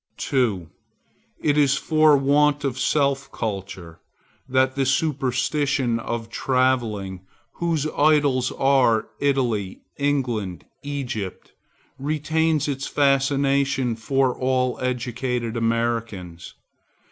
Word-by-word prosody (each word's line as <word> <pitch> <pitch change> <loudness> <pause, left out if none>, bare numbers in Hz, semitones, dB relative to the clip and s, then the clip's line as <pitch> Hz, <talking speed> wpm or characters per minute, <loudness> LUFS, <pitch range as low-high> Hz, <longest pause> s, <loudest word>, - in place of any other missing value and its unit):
2. 110 - 0 0.8
It 150 -1 +2
is 140 -2 +4
for 155 -1 +4
want 145 +1 +2
of 135 -2 -2
self 140 -2 +1
culture 95 -5 -6 0.5
that 130 0 +2
the 135 - 0
superstition 135 -2 0
of 115 0 -4
Travelling, 120 -9 0 0.4
whose 165 -4 0
idols 145 -4 +3
are 130 -5 +2
Italy, 120 -9 0 0.2
England, 120 - -1 0.2
Egypt, 125 -9 -5 0.5
retains 155 +1 0
its 140 -1 -3
fascination 140 -2 +1
for 130 +2 0
all 130 -1 0
educated 125 -1 -2
Americans. 115 -6 -2
130 Hz, 90 wpm, -23 LUFS, 115-140 Hz, 0.8 s, is